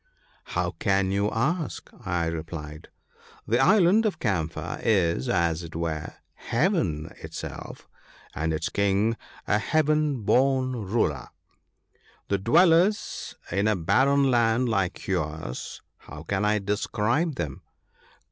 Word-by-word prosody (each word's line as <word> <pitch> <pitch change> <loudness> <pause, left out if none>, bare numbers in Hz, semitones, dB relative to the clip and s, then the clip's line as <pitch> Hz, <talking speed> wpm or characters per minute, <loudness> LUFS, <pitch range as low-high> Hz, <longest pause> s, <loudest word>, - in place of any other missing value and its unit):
" - - -35
How 90 0 0
can 95 -1 +1
you 100 +1 +1
ask? 155 +9 -2
" - - -20 0.2
I 85 - 0
replied; 80 -2 -6 0.3
" - - -26
the 120 +3 +2
island 205 +3 +5
of 195 - -2
Camphor 80 - -2
is, 85 - +1
as 85 -1 +1
it 85 -2 -9
were, 80 -2 -3 0.2
Heaven 115 - -1
itself, - - -8 0.5
and 80 +1 -1
its 80 - -2
King 100 +3 +1 0.3
a 105 - +2
heaven 150 -2 +1
born 130 +4 +2
ruler. 105 - -1 1.0
To 100 - +1
dwellers 175 - +3 0.2
in 100 +4 +1
a 110 - +3
barren 135 +10 +3
land 120 +1 +2
like 95 -5 -1
yours 75 -4 -4 0.2
how 75 0 -10
can 95 +4 -1
I 105 0 +3
describe 105 - 0
them - - -4
105 Hz, 130 wpm, -26 LUFS, 85-135 Hz, 1.0 s, island